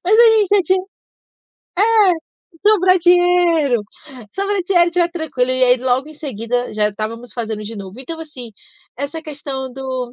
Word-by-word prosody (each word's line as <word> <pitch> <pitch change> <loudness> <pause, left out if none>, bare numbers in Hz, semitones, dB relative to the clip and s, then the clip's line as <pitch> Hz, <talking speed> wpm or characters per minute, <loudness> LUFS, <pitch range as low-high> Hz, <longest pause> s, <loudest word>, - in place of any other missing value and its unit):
Mas 430 +5 +3
a 470 -1 +8
gente 410 -3 +2
já 385 - +3
tinha 370 +1 +1 1.6
é, 370 +3 -3
sobrar 370 -3 +4
dinheiro, 345 -8 +3 0.5
só 390 - -2
quando - - -3
a 360 -1 +2
gente 345 0 +1
tiver 345 -1 +1
tranquilo, 315 -7 -2
e 255 0 +2
aí 250 0 +4
logo 260 +3 0
em 310 - -12
seguida, 245 -4 -3
já 210 -1 +2
estávamos 225 +3 -6
fazendo 220 -3 -4
de 220 +1 -7
novo. 195 +4 -9
Então, 325 +5 -7
assim, 260 -7 -9 0.5
essa 285 +4 -5
questão 275 -4 -6
do 260 -2 -5
280 Hz, 170 wpm, -18 LUFS, 245-350 Hz, 1.6 s, a